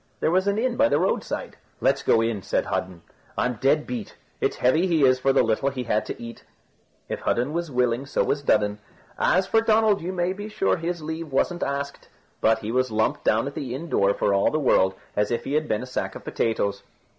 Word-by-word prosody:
There - - +1
was 185 +2 +2
an 200 +1 +1
inn 240 +1 0
by 285 +1 +4
the - - +3
roadside. - - -2 0.2
"Let's - - +2
go 115 - +3
in," 115 -3 -1
said - - -1
Hudden; 90 -3 -3 0.3
"I'm 125 -3 -1
dead 150 +3 +3
beat. 120 -4 -6 0.2
It's - - 0
heavy 155 +9 +2
he 165 -5 +2
is 130 0 +4
for 135 +1 +2
the 135 - +4
little 115 +4 +1
he 130 -2 -4
had 110 -2 0
to - - -6
eat." 115 0 -9 0.6
If - - -4
Hudden 125 +5 0
was 170 -1 -2
willing, 125 0 0
so - - +1
was 140 - -1
Dudden. 105 -6 +1 0.4
As 185 +2 +3
for 225 +3 +3
Donald, 220 -2 +3
you 175 +3 -3
may 180 0 -1
be 205 +2 -7
sure 195 -3 +1
his 170 -1 -4
leave 160 0 -5
wasn't 175 +6 0
asked, 140 0 -3 0.3
but 110 0 +4
he 110 - -2
was 130 +1 +1
lumped 110 0 0
down 110 +3 +2
at 140 - -5
the 125 -3 -4
inn 165 +5 -7
door 100 -6 +2
for 100 - +1
all 100 0 +3
the 155 - -1
world 95 -10 +3 0.2
as 105 0 +1
if 120 - -1
he 140 - -4
had 155 0 +1
been 110 +2 -1
a - - -5
sack 130 - -4
of - - -9
potatoes. 100 -3 -1
135 Hz, 230 wpm, -24 LUFS, 115-170 Hz, 0.6 s, by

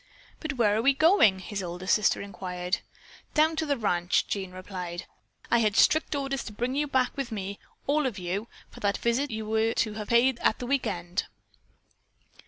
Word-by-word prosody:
"But 315 -2 -3
where 220 -5 +3
are 220 - +1
we 275 +3 +4
going?" 310 - +5
his 195 +2 -5
older 180 0 -6
sister 200 +1 +2
inquired. 180 -1 -3 0.6
"Down 315 +1 +4
to 320 -1 -1
the 285 -1 +1
ranch," 180 -5 +1
Jean 190 -2 -3
replied. 180 -1 -6 0.5
"I 235 - +5
had 215 -3 +2
strict 315 -1 +4
orders 275 -2 -2
to - - -6
bring 245 +4 -2
you 295 +2 0
back 260 -2 +1
with 270 -4 -4
me, 200 -2 -4 0.3
all 295 0 +2
of 230 -6 -4
you, 190 +5 -3 0.2
for - - -12
that 200 -1 0
visit 245 +5 0
that 220 - -4
you 220 0 -4
were 220 +1 +1
to 215 - 0
have 210 -1 -6
paid 235 +1 +3
at - - +2
the 245 - -5
weekend." 180 -9 -1
220 Hz, 190 wpm, -28 LUFS, 190-265 Hz, 0.6 s, going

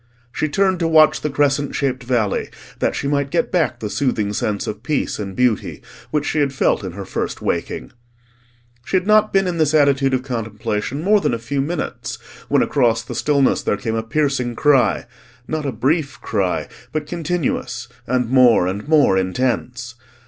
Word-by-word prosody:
She 155 - -1
turned 190 +3 +1
to 165 - +1
watch 155 -1 +5
the 150 - -1
crescent 145 0 +1
shaped 130 -2 -1
valley, 120 -5 0 0.3
that - - 0
she - - -2
might 140 -1 0
get 170 - 0
back 155 -9 +1
the 110 - -3
soothing 105 -3 -1
sense 105 -1 -1
of 105 0 -5
peace 140 -1 -1
and 100 -2 -5
beauty 125 -3 0 0.3
which 150 -1 -1
she 155 - 0
had 140 -2 +2
felt 135 - +1
in 95 -3 -5
her 100 +1 -7
first - - -3
waking. - - -3 0.9
She 185 - +1
had 180 - -1
not 215 0 +4
been 195 0 +3
in 175 -2 -2
this 155 -1 +2
attitude 140 -2 +3
of 125 - -2
contemplation 115 +2 -3
more 205 +2 +4
than 120 - +1
a - - -3
few 125 +5 -2
minutes 165 +6 -4 0.3
when - - +4
across 115 -4 +1
the - - -7
stillness 140 -3 +2
there 105 - 0
came 110 +2 -3
a 115 - 0
piercing 125 0 -1
cry; 130 -7 +3 0.4
not 155 -2 -2
a - - -1
brief 145 +3 -1
cry, 90 -8 -1 0.2
but 155 -1 -2
continuous 155 -7 -2 0.2
and 125 -1 +1
more 125 -6 +5
and 100 +7 -3
more 145 -11 +4
intense. 120 +4 -2
135 Hz, 185 wpm, -20 LUFS, 115-150 Hz, 0.9 s, watch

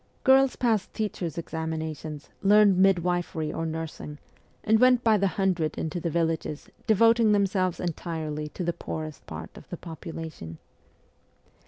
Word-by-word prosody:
Girls 265 0 +5
passed 225 -5 0
teachers' 190 -7 -3
examinations, 160 -2 -5
learned 205 -1 +6
midwifery 175 -4 +1
*or 165 - -2
nursing, 160 -2 -6 0.5
and 220 +1 +4
went 250 0 +5
by 225 -2 +5
the 200 -1 +2
hundred 180 -6 0
into 160 +2 -3
the 170 - -2
villages, 160 -2 -2 0.2
devoting 225 0 +5
themselves 195 -3 +1
entirely 160 -3 -3
to 180 - -5
the 170 0 0
poorest 155 -3 -6
part 80 +1 -8
of - - -14
the 175 - -5
population. 160 - -8
170 Hz, 135 wpm, -27 LUFS, 160-205 Hz, 0.5 s, learned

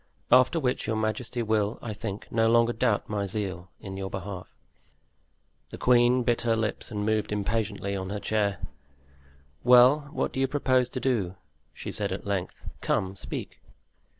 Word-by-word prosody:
After 130 +7 +5
which 125 -4 -1
your 110 - 0
majesty 110 +2 -2
will, 110 -1 0
I 110 - -5
think, 105 -1 -5
no 115 0 +3
longer 115 +1 +4
doubt 110 -2 +1
my 100 -2 -2
zeal 95 -3 -4
in 95 -1 -7
your 95 0 -4
behalf." 95 -1 -6 1.2
The - - -8
queen 125 0 +4
bit 120 0 +1
her 115 -1 +2
lips 110 -2 -2
and 105 -3 -3
moved 110 -1 0
impatiently 105 -1 -1
on 95 -1 -4
her 105 +1 -3
chair. 100 -3 0 1.1
"Well, 125 +4 +6
what - - -2
do - - -3
you 135 - +3
propose 130 -3 +2
to 130 - -4
do?" 110 -9 0 0.4
she, - - -7
said - - -2
at - - -4
length; 100 -3 -3 0.2
"come, 95 0 0
speak." - - -6
110 Hz, 165 wpm, -27 LUFS, 100-120 Hz, 1.2 s, Well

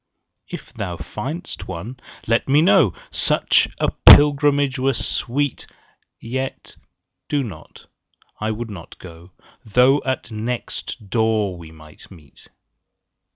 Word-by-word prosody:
If - - -9
thou 85 -1 -5
find'st 140 - -6
one, 100 +8 -7 0.3
let 115 +3 0
me 145 +3 +5
know; 175 - +4 0.2
Such - - +2
a - - 0 0.2
pilgrimage 145 -1 +6
were 135 0 +1
sweet. 140 +4 -2 0.5
20 - - -11
Yet 130 0 -4 0.5
do 145 -2 0
not; 110 -6 -11 0.5
I 110 - -2
would 110 +1 -4
not 90 -5 -11
go, 85 0 -13 0.3
Though 125 +6 +3
at 130 -2 -3
next 110 0 -5
door 110 -4 +1
we 85 -2 -11
might 80 -1 -16
meet. 80 -7 -17
115 Hz, 120 wpm, -21 LUFS, 95-135 Hz, 0.5 s, pilgrimage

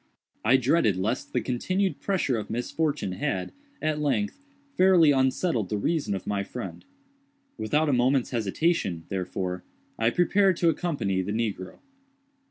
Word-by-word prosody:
I 120 +5 +5
dreaded 130 - +2
lest 110 +7 -2
the - - 0
continued 185 +10 -1
pressure 185 -10 0
of 110 - -4
misfortune 135 0 -1
had, 90 0 -2 0.3
at 155 -1 0
length, 210 - -1 0.3
fairly 180 -5 +6
unsettled 130 - +1
the 105 - -1
reason 145 -2 0
of 95 - -6
my 100 -1 -1
friend. 125 +5 -7 0.7
Without 150 +9 +1
a 145 - +2
moment's 125 +1 +2
hesitation, 115 - 0
therefore, 90 -1 -3 0.4
I 115 0 +3
prepared 185 +5 +3
to 170 - +3
accompany 145 - -1
the 100 +3 -3
negro. 105 -5 -3
125 Hz, 140 wpm, -26 LUFS, 100-165 Hz, 0.7 s, fairly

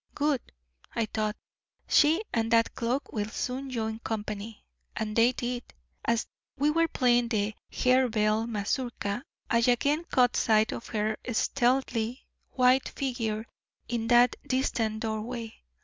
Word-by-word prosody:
'Good!' 290 -3 0 0.4
thought 215 -1 -1
I, - - -49
'she 320 +7 +4
and 225 -1 +1
that 230 0 +3
cloak 245 +4 -2
will 210 -1 -2
soon 260 +4 -3
join 220 -3 -3
company.' 215 -1 -5 0.3
And 215 -1 -3
they 235 +2 +5
did. 245 -1 -3 0.4
As 230 0 +1 0.3
we 290 +2 +3
were 330 +1 +3
playing 245 -5 +3
the 215 -2 0 0.2
Harebell 225 -4 +2
mazurka 230 0 -2 0.3
I 230 - +4
again 280 +7 +2
caught 250 -6 +3
sight 220 -1 +3
of - - -6
her 215 -1 -1
stealthy 245 0 0 0.2
white 255 +1 +3
figure 230 -5 -2 0.4
in 230 -1 -2
that 240 +1 +5
distant 225 -4 0
doorway. 225 +1 -4
235 Hz, 130 wpm, -28 LUFS, 220-255 Hz, 0.4 s, they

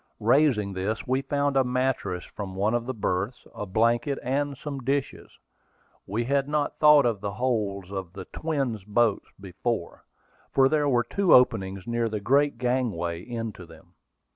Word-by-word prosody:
Raising 115 -4 +3
this, 95 +4 -3
we 130 +2 +1
found 140 +1 -1
a 135 - +4
mattress 125 -8 -1
from 95 -2 -7
one 105 +4 +1
of 120 0 -1
the 130 - -2
berths, 100 +3 -2
a 105 - -6
blanket, 115 +7 +1
and 140 +2 -1
some 140 -1 -6
dishes. 135 +2 -2 0.8
We 110 +5 -1
had 140 +2 0
not 150 -1 -1
thought 150 -2 +7
of 115 -5 0
the 100 -1 -3
holds 100 -5 -2
of 95 -3 -5
the 95 -1 -8
twin 140 -8 -2
boats 110 -1 +1
before, 100 +1 -4 0.5
for 135 -1 +5
there 150 0 +1
were 120 -2 +3
two 190 +9 +3
openings 95 -6 +2
near 120 -1 -1
the 105 -1 -3
great 140 +6 +2
gangway 115 -10 -1
into 115 -5 -6
them. 80 +2 -17
120 Hz, 165 wpm, -26 LUFS, 100-135 Hz, 0.8 s, thought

